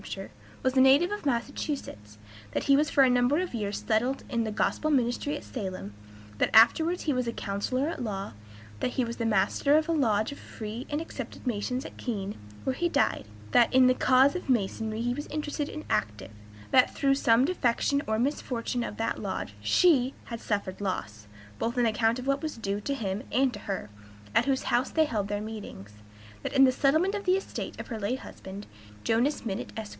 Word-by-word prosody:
H., - - -6 0.5
was 260 0 +1
a 260 - +6
native 280 +8 +5
of 415 -7 -3
Massachusetts; 235 - -3 0.4
that - - -1
he 275 - +5
was 295 +2 +2
for 275 - +5
a 260 - +5
number 250 +3 +3
of 365 -3 -2
years 210 -3 -3
settled 245 +5 +1
in 235 -1 0
the 220 - -2
gospel 305 +7 0
ministry 275 +2 +1
at - - -10
Salem; 185 - -6 0.5
that - - +3
afterwards 320 +10 +5
he 300 - +1
was 250 -1 -1
a - - 0
counselor 230 +7 -2
at 330 - -4
law; 195 - -4 0.5
that 250 - -1
he 255 - +2
was 235 +1 -6
Master 225 +6 +3
of 310 - +1
a - - 0
Lodge 225 -7 +2
of 285 - -9
Free 220 +4 -7
and 295 - -1
Accepted 330 - -8
Masons 250 +2 -2
at - - -10
Keene, 205 -5 -4 0.3
where 265 - 0
he 345 +3 0
died; 285 - +1 0.2
that 235 - +5
in 260 0 +6
the 255 - +6
cause 260 +3 +4
of 360 -5 -5
Masonry 220 -1 0
he 245 +1 0
was 290 +4 -5
interested 295 -1 -3
and 310 - -7
active; 105 -1 -2 0.4
that 255 -1 +4
through 275 -1 +3
some 245 -2 +4
defection 280 -3 +1
or 220 0 +1
misfortune 245 -1 -1
of 210 - -6
that 225 0 -2
Lodge 190 - -4
she 265 - +3
has 230 -1 -6
suffered 200 -2 -3
loss, 105 - -4 0.3
both 235 +2 -2
on 245 - +3
account 225 +1 +2
of 255 - -6
what 275 0 +1
was 310 -6 -4
due 205 -2 -2
to 280 +6 -2
him 200 -4 -3
and 265 -1 +2
to 205 - -7
her, 195 - -5 0.4
at - - +4
whose 270 -1 +1
house 245 +2 +1
they 315 -1 +3
held 210 -8 -2
their 205 0 -2
meetings; 210 - -8 0.5
that - - -4
in 270 - +6
the 260 - +6
settlement 315 +9 +2
of 410 -1 -4
the 370 0 +4
estate 390 - -6
of - - -7
her 225 -3 -4
late 215 +5 -1
husband, 195 +2 -9 0.4
Jonas 240 +7 +1
Minott, 195 -3 -4
Esq. 220 -2 -5
245 Hz, 205 wpm, -28 LUFS, 210-280 Hz, 0.5 s, a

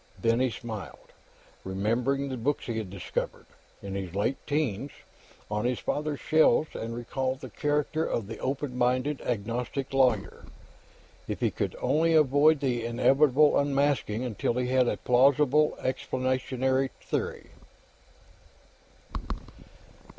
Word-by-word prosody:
Then 115 +1 +2
he 130 0 +2
smiled, 110 -7 -8 0.5
remembering 120 +9 0
the 130 - -3
books 135 +5 -1
he 115 -2 -2
had 105 -4 -5
discovered, 95 -1 -4 0.4
in 100 -1 -5
his 95 -2 -5
late 105 +7 0
'teens, 145 -4 -1 0.6
on 105 +2 -1
his 125 -1 +1
father's 150 -1 -2
shelves 155 0 +3
and 115 +1 -4
recalling 130 +2 -2
the 140 - -10
character 150 +2 0
of 115 -8 -2
the 110 +2 -7
openminded 130 0 -1
agnostic 120 +4 -3
lawyer. 130 -2 +1 0.8
If - - -3
he - - +1
could - - -3
only 165 +2 +2
avoid 150 +1 +5
the 125 -4 0
inevitable 135 +5 +4
unmasking 140 -5 +1
until 115 0 -1
he 125 0 -1
had 130 -1 +3
a - - 0
plausible 140 +4 +3
explanatory 130 +1 0
theory. - - -4
130 Hz, 120 wpm, -28 LUFS, 115-145 Hz, 0.8 s, avoid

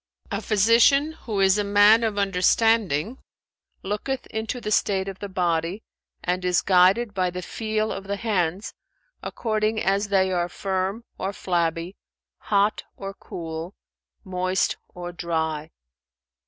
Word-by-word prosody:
"A - - -2
physician, 230 +8 +4
who 220 -10 -5
is 195 +1 +4
a - - +1
man 205 +3 +5
of 215 -2 -1
understanding, 200 - +2 0.6
looketh 210 +7 -3
into 220 +3 -3
the 210 - -4
state 195 -2 +1
of 195 -1 -6
the 205 - -6
body 175 +1 -1 0.4
and 180 +1 -1
is 180 -1 +2
guided 195 +4 +4
by 185 -1 0
the 180 +1 -6
feel 215 +1 -2
of 195 - -5
the 200 +1 -2
hands,[FN#400] 200 -3 -1 0.5
according 215 -1 -1
as 200 +1 +1
they 190 -2 +2
are 175 -1 0
firm 190 +4 -2 0.2
or 195 - -2
flabby, 170 0 -1 0.4
hot 205 +1 +1
or 195 0 -6
cool, 165 0 -7 0.5
moist 185 -1 0
or 175 0 -7
dry. 160 -3 -2
195 Hz, 135 wpm, -24 LUFS, 180-215 Hz, 0.6 s, man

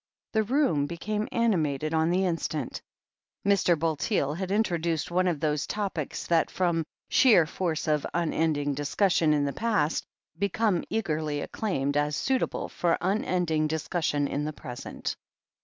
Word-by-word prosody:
' - - -67
The 220 - +3
room 215 - +2
became 210 +6 -3
animated 155 - +1
on 160 0 +2
the 185 +2 +2
instant. 165 -3 -2 0.6
Mr. 195 -4 +3
Bulteel 150 -2 0
had 185 +3 -4
introduced 170 -6 0
one 185 +1 +2
of 170 -5 0
those 150 0 0
topics, 195 -8 -3
that, 165 -2 +2
from 170 -4 0 0.2
sheer 220 - +6
force 165 0 -2
of 150 -2 +1
unending 155 -3 0
discussion 155 +3 +2
in 145 -1 +2
the 140 - -2
past, 165 -10 0 0.4
become 200 -1 +1
eagerly 155 -9 -1
acclaimed 145 -9 -1
as 145 0 +1
suitable 260 - 0
for 170 -1 0
unending 180 -5 +1
dis 160 0 -3
cussion 145 -5 0
in 145 +1 -2
the 155 +1 -3
present. 125 -4 -6
165 Hz, 145 wpm, -27 LUFS, 150-190 Hz, 0.6 s, sheer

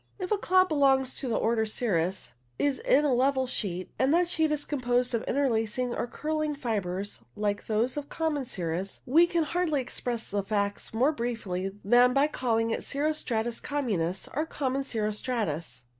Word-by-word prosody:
If 370 -1 -5
a 425 - +3
cloud 370 0 +4
belongs 270 -4 +3
to 270 - -3
the 230 - 0
order 225 0 +2
cirrus, 190 -5 -1 0.2
is 285 -2 +1
in 295 +2 +3
a 280 - +3
level 260 +1 +2
sheet, 185 -7 -3
and 265 +2 +3
that 350 0 +3
sheet 320 -2 +1
is 295 -1 0
composed 245 -3 0
of 230 - +1
interlacing 245 -2 0
or - - -2
curling 305 +3 -2
fibres, 205 - -3 0.2
like 205 -1 -2
those 230 +5 0
of 290 -1 -4
common 310 -4 -1
cirrus, 180 -2 -4
we 325 +7 +5
can 340 -1 +1
hardly 315 -1 0
express 245 -2 -3
the 200 0 -1
facts 200 0 -2
more 250 +7 +3
briefly 200 -7 -3
than 245 +4 +6
by 275 +1 +5
calling 230 -6 0
it - - -2
cirro 295 +2 0
stratus 235 -5 -2
communis, 200 - -1
or 305 +4 -1
common 275 -3 -1
cirro 215 -5 -1
stratus. 170 - -3
245 Hz, 175 wpm, -28 LUFS, 210-285 Hz, 0.2 s, than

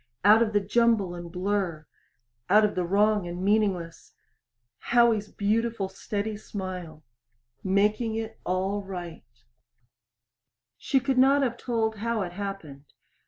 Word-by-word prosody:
Out 215 +2 +7
of 225 -2 +2
the 205 - +3
jumble 210 -2 +2
and 175 -1 -8
blur 180 -4 -2 0.6
out 210 +1 +6
of 210 - -1
the 180 - -1
wrong 205 0 +2
and 175 +1 -5
meaningless 195 -5 -1 0.6
Howie's 235 -3 +2
beautiful 215 -1 -1
steady 205 +2 -4
smile 185 -7 -7 0.6
making 210 +4 +1
it 225 0 -5
all 190 +3 -1
right. 175 -6 -8 1.6
She 270 - +1
could 265 0 0
not 275 +2 +5
have 240 -3 0
told 225 -3 -2
how 225 0 -1
it 175 - -5
happened. 180 -8 -7
205 Hz, 125 wpm, -26 LUFS, 185-225 Hz, 1.6 s, Out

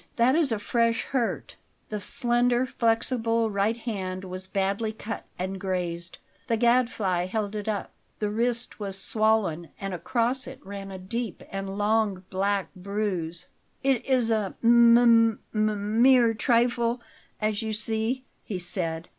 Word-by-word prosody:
That 240 +2 +4
is 315 -6 +3
a 225 - +1
fresh 230 +2 +1
hurt." 250 -4 -2 0.3
The 210 - -3
slender, 240 +4 +2
flexible 230 -1 +1
right 205 +3 +1
hand 190 -5 -4
was 185 0 -4
badly 200 +3 -1
cut 220 +1 -6
and 190 +1 -3
grazed. 175 -2 -2 0.3
The 230 - +1
Gadfly 230 -7 +2
held 210 +1 -2
it 210 0 -5
up. 210 -2 -2 0.3
The 210 -1 -1
wrist 235 +2 -2
was 195 -2 -4
swollen, 205 -5 +1
and 195 -1 -4
across 235 +8 -1
it 265 0 -9
ran 195 0 -7
a 190 - -7
deep 215 +3 -4
and 195 0 -4
long 205 -2 +1
black 195 +1 0
bruise. 185 -4 -3 0.4
"It 265 -3 +2
is 250 -3 +2
a 215 -3 0
m 235 0 +7
m 230 -2 +5 0.6
mere 250 -3 +6
trifle, 235 +1 +2 0.4
as 215 0 0
you 220 -1 -3
see," 225 +4 -2 0.2
he 200 - -4
said. 170 -2 -3
220 Hz, 145 wpm, -26 LUFS, 195-235 Hz, 0.6 s, m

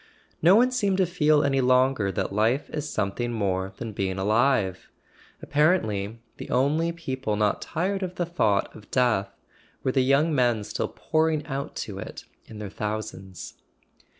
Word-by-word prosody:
No 175 +5 +7
one 250 +3 +5
seemed 205 -7 +1
to 190 - +3
feel 155 -4 +3
any 135 -1 +2
longer 125 -5 +3
that 95 - -2
life 115 +7 +1
is 150 -1 -4
something 105 +4 -2
more 95 -4 -1
than 115 -2 -6
being 95 -1 -2
alive; 105 -2 +1 0.5
apparently 115 - +1 0.2
the - - -8
only 150 +6 +2
people 130 -10 -3
not 105 -1 +1
tired 190 +4 -2
of 180 -1 -4
the 175 - -1
thought 110 - 0
of 105 - -14
death 120 -6 +2 0.5
were 130 - +1
the 130 - +2
young 140 +5 +3
men 120 -5 +2
still 105 +1 -3
pouring 155 -1 0
out 140 0 -5
to 100 -2 -7
it - - -8 0.2
in 110 - -10
their 105 -2 -6
thou¬ 105 +1 -2
sands. 95 -3 -10
125 Hz, 165 wpm, -26 LUFS, 105-155 Hz, 0.5 s, No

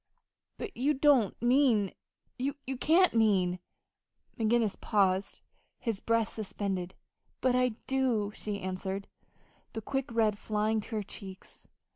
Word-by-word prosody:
"But 415 -4 -6
you 285 +5 +1
don't 265 -7 +3
mean 240 -6 +4 0.5
you 275 +3 0 0.3
can't 350 +6 +4
mean 190 -6 +3 0.4
" - - -36
McGinnis 225 -1 +1
paused, 195 -2 +1 0.4
his 225 -5 -3
breath 230 -1 +1
suspended. 195 -3 -4 0.4
"But 255 -1 +2
I 250 -2 +2
do," 250 -6 +1
she 205 -2 -5
answered, 190 +1 -4 0.7
the 225 - -4
quick 270 +1 -2
red 220 -3 +2
flying 215 +1 0
to 220 - -7
her 210 - -1
cheeks. 195 -1 -10
220 Hz, 125 wpm, -30 LUFS, 200-250 Hz, 0.7 s, mean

